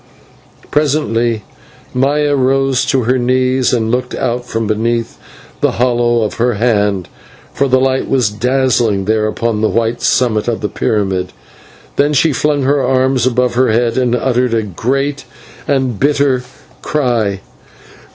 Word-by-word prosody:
Presently 120 Hz, -7 st, 0 dB, 0.5 s
Maya 145 Hz, +3 st, +1 dB
rose 135 Hz, 0 st, +1 dB
to 130 Hz, -1 st, +1 dB
her 125 Hz, +3 st, +1 dB
knees 130 Hz, +1 st, +1 dB
and 115 Hz, -2 st, 0 dB
looked 125 Hz, 0 st, -2 dB
out 125 Hz, -1 st, -2 dB
from 115 Hz, -1 st, -2 dB
beneath 115 Hz, +2 st, -1 dB, 0.4 s
the -, -, +1 dB
hollow 120 Hz, -1 st, +1 dB
of 105 Hz, -, -3 dB
her 120 Hz, -1 st, +2 dB
hand, 105 Hz, -5 st, 0 dB, 0.5 s
for 140 Hz, -, +1 dB
the 130 Hz, 0 st, +3 dB
light 130 Hz, 0 st, 0 dB
was 125 Hz, -6 st, +2 dB
dazzling 120 Hz, -3 st, +1 dB
there 110 Hz, +1 st, +1 dB
upon 110 Hz, 0 st, -2 dB
the 110 Hz, -, +2 dB
white 115 Hz, +1 st, -1 dB
summit 115 Hz, -4 st, +1 dB
of 120 Hz, -2 st, -1 dB
the 105 Hz, -, -2 dB
pyramid. 95 Hz, -3 st, -1 dB, 0.6 s
Then 145 Hz, +1 st, +2 dB
she 150 Hz, +2 st, +2 dB
flung 145 Hz, 0 st, 0 dB
her 140 Hz, +1 st, +2 dB
arms 130 Hz, -1 st, +1 dB
above 125 Hz, -1 st, +1 dB
her 130 Hz, +1 st, +2 dB
head 115 Hz, +1 st, +1 dB
and 125 Hz, -2 st, +1 dB
uttered 125 Hz, -1 st, 0 dB
and 105 Hz, -5 st, -3 dB
great 135 Hz, +5 st, -1 dB, 0.4 s
and 130 Hz, -6 st, 0 dB
bitter 140 Hz, -2 st, +2 dB, 0.4 s
cry. 115 Hz, -9 st, -1 dB
125 Hz, 145 wpm, -15 LUFS, 115-130 Hz, 0.6 s, the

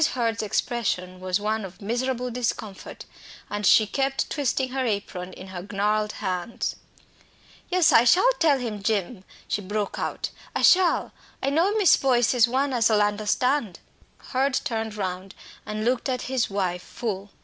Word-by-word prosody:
Hurd's 230 Hz, -2 st, 0 dB
expression 195 Hz, -4 st, -2 dB
was 185 Hz, +1 st, -1 dB
one 215 Hz, +1 st, -1 dB
of 190 Hz, -1 st, -9 dB
miserable 245 Hz, +3 st, -2 dB
discomfort, 220 Hz, -4 st, -4 dB, 0.5 s
and 205 Hz, -1 st, 0 dB
she 220 Hz, -, +6 dB
kept 270 Hz, +5 st, -1 dB
twisting 265 Hz, -2 st, 0 dB
her 265 Hz, +1 st, -2 dB
apron 200 Hz, -5 st, -3 dB
in 190 Hz, +1 st, -11 dB
her 180 Hz, -2 st, -6 dB
gnarled 210 Hz, +1 st, 0 dB
hands. 185 Hz, +2 st, -3 dB, 0.9 s
"Yes, 365 Hz, -3 st, +4 dB
I 230 Hz, -, +7 dB
shall 365 Hz, -, +5 dB
tell, 305 Hz, -4 st, +4 dB, 0.2 s
Jim!" 200 Hz, 0 st, -1 dB, 0.2 s
she 205 Hz, -, -1 dB
broke 205 Hz, +1 st, -3 dB
out. -, -, -3 dB, 0.2 s
"I -, -, 0 dB
shall. 365 Hz, -1 st, +4 dB, 0.3 s
I 275 Hz, -, +1 dB
know 360 Hz, +8 st, +2 dB
Miss 400 Hz, -6 st, +6 dB
Boyce 245 Hz, -4 st, +2 dB
is 240 Hz, -2 st, +5 dB
one 265 Hz, +3 st, 0 dB
as 235 Hz, -2 st, +3 dB
ull 215 Hz, -1 st, +3 dB
understand 210 Hz, +2 st, +1 dB, 0.3 s
" -, -, -36 dB
Hurd 265 Hz, +1 st, +1 dB
turned 220 Hz, -2 st, -3 dB
round 190 Hz, -1 st, -4 dB, 0.3 s
and 215 Hz, +1 st, -3 dB
looked 250 Hz, +2 st, 0 dB
at 255 Hz, -1 st, -2 dB
his 255 Hz, -2 st, -1 dB
wife 185 Hz, -3 st, -1 dB
full. 205 Hz, -3 st, -5 dB
220 Hz, 160 wpm, -25 LUFS, 200-255 Hz, 0.9 s, I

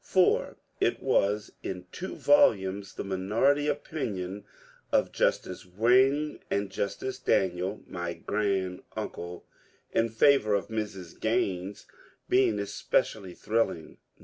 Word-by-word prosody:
For 185 Hz, -1 st, +2 dB, 0.2 s
it -, -, +1 dB
was 105 Hz, +2 st, +1 dB
in 90 Hz, -1 st, -5 dB
two 190 Hz, +2 st, -6 dB
volumes, 100 Hz, -, +3 dB
the -, -, -4 dB
minority 110 Hz, +10 st, +1 dB
opinion 105 Hz, -, -3 dB, 0.5 s
of -, -, +2 dB
Justice 90 Hz, -, 0 dB
Wayne 130 Hz, +10 st, +3 dB
and 100 Hz, -1 st, -1 dB
Justice 130 Hz, +7 st, -3 dB
Daniel 95 Hz, -3 st, 0 dB
(my 85 Hz, -1 st, -4 dB
grand 95 Hz, 0 st, -1 dB, 0.2 s
uncle) 85 Hz, 0 st, -6 dB, 0.5 s
in 115 Hz, 0 st, +2 dB
favour 110 Hz, -2 st, +4 dB
of 100 Hz, -, -2 dB
Mr8.Gttine8 100 Hz, -1 st, -2 dB, 0.4 s
being 125 Hz, -4 st, +3 dB
especially 100 Hz, -1 st, -1 dB
thrilling. 105 Hz, -8 st, -1 dB
100 Hz, 105 wpm, -28 LUFS, 95-120 Hz, 0.5 s, favour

